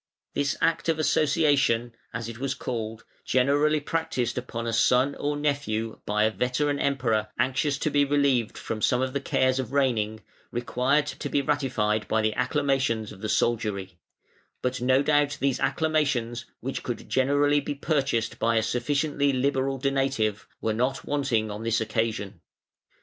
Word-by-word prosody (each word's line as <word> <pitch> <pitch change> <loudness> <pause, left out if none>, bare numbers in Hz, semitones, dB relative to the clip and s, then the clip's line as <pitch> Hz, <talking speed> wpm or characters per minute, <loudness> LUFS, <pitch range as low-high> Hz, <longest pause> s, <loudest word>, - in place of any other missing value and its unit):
This 140 -1 0
act 165 0 +1
of 160 - +2
"association" 145 -6 +2 0.2
as 115 -1 -4
it 115 0 -8
was 135 0 -2
called, 115 -2 -4 0.2
generally 145 +4 +2
practised 145 -6 -2
upon 120 -2 -4
a 115 - -2
son 125 +4 +3
or 145 +1 -2
nephew 140 -7 -1
by 105 +1 +2
a 110 - +3
veteran 125 +7 0
Emperor 120 -6 +1
anxious 140 +2 +1
to 155 - -1
be 145 0 +4
relieved 140 -5 +1
from 110 -1 -4
some 125 - +2
of 130 0 -2
the 140 - -1
cares 130 -1 +1
of 130 0 -4
reigning, 110 -6 +1 0.3
required 125 +4 +1
to 150 - -5
be 140 - +1
ratified 125 -7 0
by 110 0 +1
the 110 0 +1
acclamations 130 -4 0
of 95 -2 -12
the 110 - -3
soldiery; 100 -7 -1 0.6
but 125 -1 -1
no 130 +2 +3
doubt 145 -1 +2
these 135 -1 +1
acclamations, 140 -7 0 0.2
which 135 +2 -3
could 120 - -5
generally 145 +2 +3
be 145 +1 -4
purchased 140 -6 -1
by 115 0 +2
a 110 - +3
sufficiently 140 +4 0
liberal 135 0 0
donative, 135 -6 0
were 110 - 0
not 125 +4 -1
wanting 130 -7 0
on 105 +1 -6
this 115 0 +1
occasion. 110 -4 -2
130 Hz, 160 wpm, -26 LUFS, 115-145 Hz, 0.6 s, be